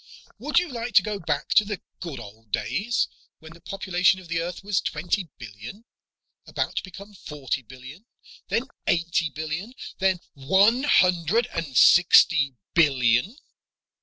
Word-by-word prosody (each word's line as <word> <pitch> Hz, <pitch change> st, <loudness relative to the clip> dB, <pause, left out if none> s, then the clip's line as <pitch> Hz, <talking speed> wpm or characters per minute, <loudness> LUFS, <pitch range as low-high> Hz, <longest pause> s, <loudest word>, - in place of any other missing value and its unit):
"Would 295 Hz, -2 st, -2 dB
you 355 Hz, +1 st, +4 dB
like 240 Hz, -5 st, -6 dB
to 190 Hz, -, +7 dB
go 210 Hz, -1 st, -4 dB
back 170 Hz, -, -3 dB
to -, -, +5 dB
the 205 Hz, -2 st, -5 dB, 0.2 s
good 160 Hz, -8 st, -7 dB
old 110 Hz, 0 st, -13 dB
days, 230 Hz, -, -1 dB, 0.3 s
when 160 Hz, +1 st, -14 dB
the 170 Hz, -, -18 dB
population 185 Hz, 0 st, +1 dB
of 180 Hz, -3 st, -15 dB
the 165 Hz, 0 st, -1 dB
Earth 175 Hz, +3 st, -6 dB
was 200 Hz, -2 st, 0 dB
twenty 175 Hz, +3 st, -2 dB
billion 120 Hz, -, -11 dB, 0.6 s
about -, -, -3 dB
to -, -, -1 dB
become 200 Hz, +2 st, -12 dB
forty 145 Hz, -7 st, -5 dB
billion, 130 Hz, -, -13 dB, 0.4 s
then -, -, -2 dB, 0.2 s
eighty 165 Hz, -1 st, +1 dB
billion, 160 Hz, +11 st, -6 dB, 0.2 s
then 190 Hz, -2 st, +1 dB
one 190 Hz, -, +3 dB
hundred 180 Hz, -, +3 dB
and 155 Hz, -6 st, -3 dB
sixty 160 Hz, -5 st, +5 dB, 0.2 s
billion? 135 Hz, -, +2 dB
175 Hz, 145 wpm, -24 LUFS, 145-200 Hz, 0.6 s, to